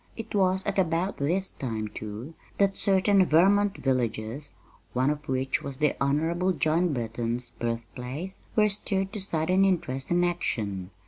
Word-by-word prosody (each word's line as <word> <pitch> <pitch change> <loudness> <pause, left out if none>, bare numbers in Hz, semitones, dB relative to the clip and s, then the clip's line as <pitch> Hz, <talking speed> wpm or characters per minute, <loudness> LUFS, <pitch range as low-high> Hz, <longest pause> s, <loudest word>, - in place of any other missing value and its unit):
It 225 - -7
was 190 -1 +2
at 200 -1 0
about 175 +2 +1
this 180 +7 0
time, 110 -5 -3
too, 110 +8 -7 0.2
that 195 -1 +3
certain 195 0 +4
Vermont 195 +5 +4
villages 120 0 -2 0.4
one 130 +3 +2
of 150 0 -6
which 130 0 0
was 140 -2 -5
the 150 0 +2
Honorable 165 +6 +1
John 165 +2 +2
Burton's 120 -1 -3
birthplace 125 +9 -4 0.2
were 215 -1 +5
stirred 195 -1 -1
to 210 - -3
sudden 180 +1 +2
interest 145 -9 0
and 175 0 +3
action. 105 - -2
160 Hz, 145 wpm, -27 LUFS, 125-190 Hz, 0.4 s, were